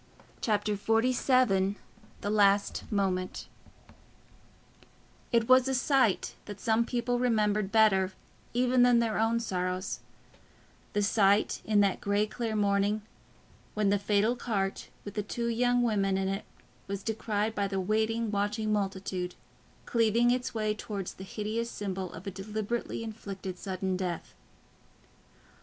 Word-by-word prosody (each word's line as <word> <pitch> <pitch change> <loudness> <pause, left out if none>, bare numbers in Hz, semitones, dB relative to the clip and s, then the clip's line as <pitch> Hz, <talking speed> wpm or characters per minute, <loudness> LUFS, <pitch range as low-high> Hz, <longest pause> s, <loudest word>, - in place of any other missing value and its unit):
Chapter 210 -2 +1
XLVII 225 -2 +2 0.5
The 205 - -2
Last 200 0 +2
Moment 185 -3 -1 1.8
It 230 -2 +2
was 255 0 +6
a 265 - +1
sight 255 -5 +2
that 205 -1 -8
some 230 +1 +1
people 245 0 0
remembered 210 -4 +1
better 205 -4 +4 0.4
even 250 +1 +3
than 245 -1 +6
their 230 -2 +1
own 225 +1 +2
sorrows—the 185 +1 -5
sight 200 0 +3
in 210 -1 +4
that 200 -2 +1
grey 205 +1 +1
clear 225 0 -3
morning, 205 0 +1 0.7
when 210 -1 +2
the 200 0 +2
fatal 210 +4 +2
cart 200 -5 -2 0.2
with 205 - -6
the 210 - -1
two 235 +3 -3
young 245 +1 +2
women 200 -4 +1
in 190 0 0
it 195 +1 -3 0.4
was 200 0 -4
descried 220 -1 -1
by 200 -2 0
the 195 -1 -2
waiting 220 +3 0
watching 210 +1 0
multitude, 190 -3 -2 0.5
cleaving 230 +1 +3
its 250 0 -1
way 215 -1 0
towards 205 -3 -5
the 190 - -10
hideous 215 +4 -3
symbol 190 -4 -4
of 165 - -10
a 195 - -3
deliberately 215 +4 -3
inflicted 195 -4 -6
sudden 190 -1 -2
death. 180 -3 -4
210 Hz, 130 wpm, -29 LUFS, 195-230 Hz, 1.8 s, was